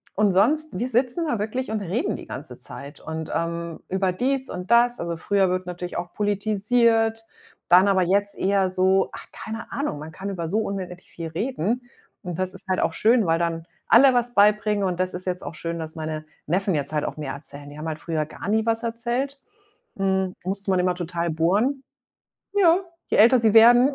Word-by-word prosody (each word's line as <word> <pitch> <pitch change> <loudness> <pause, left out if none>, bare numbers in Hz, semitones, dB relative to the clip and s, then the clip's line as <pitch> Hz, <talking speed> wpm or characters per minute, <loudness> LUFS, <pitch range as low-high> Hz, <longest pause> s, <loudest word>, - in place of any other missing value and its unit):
und 205 -1 +3
sonst 295 +12 +3
wir 240 +7 -2
sitzen 250 +7 +1
da 235 -8 -1
wirklich 220 +3 -3
und 215 -2 -1
reden 210 - -1
die - - -11
ganze - - -8
Zeit 140 +1 -9
und, 160 0 -6
ähm 170 0 -3
über 190 0 +1
dies 265 +5 0
und 180 +2 -6
das. 240 +1 +4
Also, 170 -1 -3
früher 195 +1 +2
wird 185 0 -1
natürlich 180 0 -5
auch 175 0 -5
politisiert, 225 +2 +1 0.4
dann 180 +3 +7
aber 190 -2 +3
jetzt 200 +3 +1
eher 195 -1 +2
so 190 +1 +2
ach, - - -9
keine 225 +1 -7
Ahnung, 280 - -2
man 155 +1 -8
kann 195 +4 -6
über 170 -3 -4
so 205 +7 0
unendlich 185 -4 -5
viel 165 -1 -6
reden 225 +5 -2 0.4
und 180 -2 -5
das 185 0 -2
ist - - -12
halt 185 - +1
auch - - 0
schön, 225 +4 +3
weil 165 0 +2
dann 165 -1 -2 0.2
alle 260 +2 +7
was 245 0 +1
beibringen, 210 0 +3
und 180 -1 -2
das 185 0 0
ist 185 - -6
jetzt 180 -1 -3
auch - - -7
schön, 170 +1 -4
dass 160 0 -6
meine 155 -1 -4 0.2
Neffen 190 +3 +1
jetzt 145 0 -2
halt 150 -1 0
auch - - -5
mehr 150 -3 -4
erzählen. 145 0 -10
Die 145 - -11
haben 155 - -5
halt 155 -1 -4
früher 160 -2 -2
gar 200 - -7
nie 220 +1 +2
was 225 0 +1
erzählt. 240 +4 -2 0.6
Hm, 190 -1 0
da 185 - -7
musste 195 +1 -2
man 185 - +3
immer 180 0 +1
total 170 -1 -3
bohren. 205 - +1 0.7
Ja, 365 -4 +5 0.3
je - - 0
älter 240 +4 +7
sie 220 -2 +3
werden, 240 +4 +7
195 Hz, 210 wpm, -24 LUFS, 170-225 Hz, 0.7 s, dann